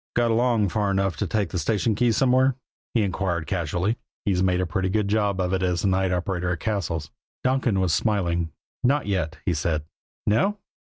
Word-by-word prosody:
"Got 120 -1 +3
along 115 -3 +2
far 105 -1 0
enough 95 -3 +1
to - - -1
take 105 -3 -1
a 90 - 0
station 105 +7 +1
key 120 +3 +2
somewhere?" 130 +2 +3 0.4
he 115 - +4
inquired 90 -4 -1
casually. 90 +6 -1 0.3
"He's 95 -4 +2
made 90 -1 +2
a 90 - +1
pretty 95 +3 -1
good 105 +1 +1
job 100 -2 +1
of 90 0 0
it 95 - +1
as 90 -2 0
the 100 - +3
night 95 0 +1
operator 90 0 -1
at 85 - -2
Cassil's." 85 -8 -2 0.3
Donkin 130 -6 +2
was 90 -4 +2
smiling. 85 -4 0 0.3
"Not 140 +4 +2
yet," 90 -5 -1
he - - +2
said. 80 -3 -1 0.4
"No?" 195 - +2
95 Hz, 195 wpm, -25 LUFS, 90-110 Hz, 0.4 s, he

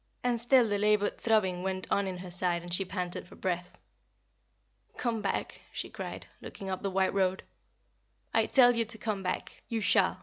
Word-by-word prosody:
And 240 -2 +1
still 245 0 +5
the 205 -1 0
labored 210 0 +2
throbbing 190 -6 +2
went 190 0 -2
on 200 -1 +2
in 185 -1 -4
her 180 0 -8
side 175 -1 0
and 175 0 -6
she 195 - +3
panted 180 -2 -4
for - - -14
breath. 180 -1 -3 1.2
"Come 230 -3 -1
back," 200 - -2
she - - -5
cried, - - -6 0.2
looking 195 -1 -6
up 185 - -3
the 200 - -1
white 190 0 +1
road. 190 -1 +1 0.9
"I - - +3
tell 245 -2 +6
you 230 - +3
to 225 +1 -2
come 215 -2 -2
back. 185 -1 -4
You 230 - -1
shall. 210 - +3
195 Hz, 190 wpm, -30 LUFS, 185-220 Hz, 1.2 s, tell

